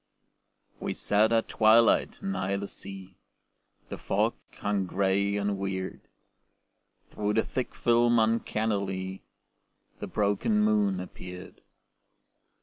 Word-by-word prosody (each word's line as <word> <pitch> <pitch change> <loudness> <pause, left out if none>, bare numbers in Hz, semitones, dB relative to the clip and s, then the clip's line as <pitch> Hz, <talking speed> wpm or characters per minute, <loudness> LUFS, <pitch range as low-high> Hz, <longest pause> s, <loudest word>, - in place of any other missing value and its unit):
We - - -3
sat 105 +2 +2
at 115 -1 +2
twilight 110 - +4
nigh 195 - -1
the 100 0 -3
sea, 95 -2 -9 0.7
The - - -6
fog - - +1 0.2
hung 100 -2 -1
gray 100 +2 +1
and 100 -1 -1
weird. 95 -1 -4 1.1
Through 105 0 -1
the 110 - +3
thick 130 - -4
film 120 0 +3
uncannily 100 -4 -1 0.8
The - - -5
broken 105 - +1
moon 210 -2 +2
appeared. 90 0 -9
105 Hz, 105 wpm, -28 LUFS, 95-115 Hz, 1.1 s, twilight